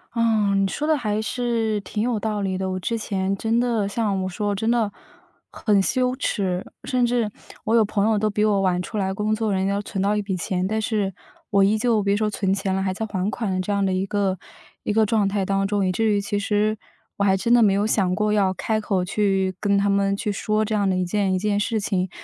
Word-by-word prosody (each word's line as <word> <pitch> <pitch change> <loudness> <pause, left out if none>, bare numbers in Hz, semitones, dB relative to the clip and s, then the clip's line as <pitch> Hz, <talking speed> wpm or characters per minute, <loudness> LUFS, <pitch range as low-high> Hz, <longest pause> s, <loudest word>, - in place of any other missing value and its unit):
嗯， 215 -4 +2
你 - - +2
说 300 +10 -3
的 310 -2 +3
还 215 -3 -1
是 225 -2 -1
挺 210 +2 -4
有 235 -1 0
道 210 -1 -2
理 190 -1 -1
的。 190 0 -2
我 185 - -2
之 230 +5 -2
前 195 -2 -1
真 225 +2 +1
的 235 -4 +1
像 200 -3 -1
我 - - -2
说， 205 +2 -2
真 220 +4 0
的 230 -4 +1 0.6
很 210 -2 +1
羞 255 +4 +1
耻， 190 -8 -1 0.2
甚 250 -1 +1
至 235 -2 +1 0.3
我 225 - +1
有 225 -2 +5
朋 205 0 0
友 220 - +2
都 215 +1 +1
比 210 0 0
我 210 -2 +3
晚 180 -2 +1
出 210 +4 -6
来 190 -1 0
工 210 +2 0
作， 220 -2 -1
人 190 0 0
家 200 - 0
都 200 - -1
存 195 -2 -4
到 200 +2 +2
一 210 - 0
笔 195 -2 -2
钱， 180 +1 -2
但 220 +3 -1
是 210 -3 -1 0.4
我 200 -2 +4
依 205 +3 +3
旧 225 -1 +2
别 200 0 +1
说 215 0 +1
存 200 -2 -1
钱 195 -1 0
了， 190 - 0
还 190 0 0
在 205 +4 -3
还 195 -2 -2
款 215 -3 -3
的 185 0 0
这 195 - -3
样 200 -1 +1
的 190 - 0
一 185 +1 0
个 195 -2 0 0.4
一 - - -2
个 220 +1 +3
状 210 -1 +2
态 195 -1 -1
当 195 0 0
中。 200 -1 0
以 185 - +1
至 225 +5 0
于 205 - +2
其 205 0 -2
实 210 +1 +1 0.4
我 200 - 0
还 195 -1 +3
真 235 +5 +1
的 240 - +6
没 210 - +5
有 200 +2 +1
想 190 -4 +1
过 210 +1 +1
要 200 -3 +3
开 215 +3 -1
口 190 -4 0
去 195 -1 +1
跟 200 -1 +2
他 200 +1 +2
们 200 0 +1
去 210 - -2
说 215 +2 0
这 220 - -3
样 200 -2 +1
的 185 - +1
一 185 - 0
件 195 +1 0
一 - - +1
件 205 +1 0
事 220 +2 0
情。 190 -3 -1
205 Hz, 280 characters per minute, -23 LUFS, 195-220 Hz, 0.6 s, 的